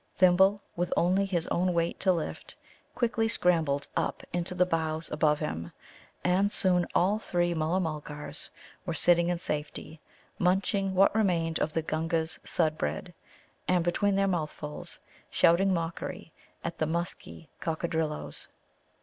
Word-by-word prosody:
Thimble, 190 +2 +5
with 175 0 -1
only 190 +3 +3
his 175 -3 0
own 180 0 +1
weight 170 0 0
to 190 - +3
lift, 170 -3 -4 0.4
quickly 230 -2 +1
scrambled 160 -9 +1
up - - -1
into 175 +1 -2
the 180 0 +4
boughs 160 -2 -1
above 150 0 +3
him. 80 - -4 0.5
And 190 +3 +3
soon 180 -3 +2
all 200 +4 +3
three 175 -4 0
Mulla 160 +3 +1
mulgars 150 -3 -5 0.3
were 170 -4 -3
sitting 170 0 +4
in 175 - 0
safety, 150 -1 -5 0.4
munching 195 +1 +1
what 195 +2 +5
remained 170 -7 +1
of 155 - -1
the 165 - 0
Gunga's 160 +1 -1
Sudd 155 -2 0
bread, 75 +2 -3 0.5
and 180 -2 +3
between 195 +4 +1
their 195 0 +2
mouthfuls 155 -4 -3 0.3
shouting 185 +4 +4
mockery 165 -2 -3 0.3
at - - -4
the 155 - +1
musky 170 0 -4
Coccadrilloes. 160 - -2
170 Hz, 140 wpm, -29 LUFS, 160-185 Hz, 0.5 s, Thimble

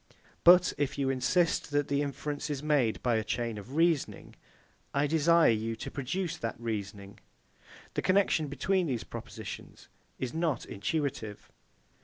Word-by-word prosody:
But 180 +1 +7
if 140 -1 -1
you 135 -1 +1
insist 165 +6 +1
that 145 -1 +1
the 140 0 +1
inference 145 +1 -3
is 145 -1 -3
made 140 -7 +1
by 120 -2 +2
a 110 - 0
chain 115 -1 -2
of 125 +8 -10
reasoning, 165 -3 +1 0.6
I 140 +1 +3
desire 160 0 +4
you 115 +1 -1
to - - -7
produce 165 +6 -3
that 115 -6 -4
reasoning. 100 -3 -5 0.7
The - - -1
connexion 185 -5 +2
between 175 +6 0
these 125 -5 -2
propositions - - -9 0.3
is 130 -2 -4
not 160 -5 -1
intuitive. 110 -1 -3
140 Hz, 145 wpm, -30 LUFS, 115-160 Hz, 0.7 s, But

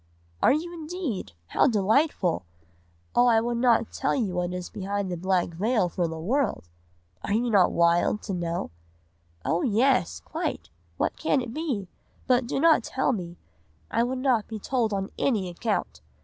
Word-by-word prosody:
"'Are - - +6
you 330 +5 -1
indeed? 320 - -4 0.2
How - - +3
delightful! 215 - +2 0.7
Oh, 245 - +5
I 230 -2 +5
would 235 +1 -1
not 235 -2 +3
tell 270 - 0
you 215 -8 -1
what 180 0 -1
is 180 -1 -4
behind 200 -1 -3
the - - -1
black 185 +1 +1
veil 200 +3 +1
for 175 0 -1
the 160 0 -5
world! 215 - -1 0.6
Are 200 - 0
not 225 -5 +4
you - - -7
wild 170 +4 +3
to 200 - -4
know?' 170 - -3 0.7
"'Oh 165 +2 +1
yes, 250 +3 +2
quite! - - -4 0.3
what - - -1
can 290 - +1
it 245 -2 -5
be? 270 - -2 0.4
But 250 -1 +2
do 270 - -1
not 320 -5 +5
tell 265 +3 0
me, 175 -5 -5 0.5
I - - +2
would 250 +2 0
not 255 -5 +1
be 220 - -5
told 230 +1 0
on 195 -1 -2
any 215 -8 +1
account. 205 +5 -2
220 Hz, 170 wpm, -26 LUFS, 180-255 Hz, 0.7 s, Are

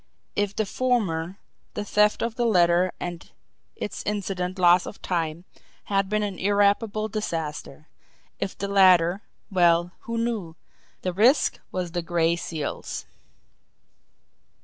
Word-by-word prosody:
If 205 -1 0
the 220 - 0
former, 195 -7 -1 0.4
the 205 - -3
theft 210 +1 +2
of 230 -1 -1
the 240 +1 0
letter 175 -2 +4
and 175 -1 -6 0.5
its - - -5
incident 195 -3 -3
loss 175 0 +5
of - - -9
time 165 -1 -2 0.4
had 195 -1 0
been 215 0 +1
an 200 -3 -4
irreparable 205 +2 +2
disaster; 160 -8 -5 0.5
if 195 - -3
the 200 - -3
latter 185 -2 +5 0.3
well, 175 -1 +3
who 230 0 -5
knew! 220 -8 -2 0.5
The 185 - -1
risk 240 - +3
was 180 -2 -3
the 175 - -2
Gray 170 0 +1
Seal's! 160 -3 -5
185 Hz, 125 wpm, -25 LUFS, 175-210 Hz, 0.5 s, loss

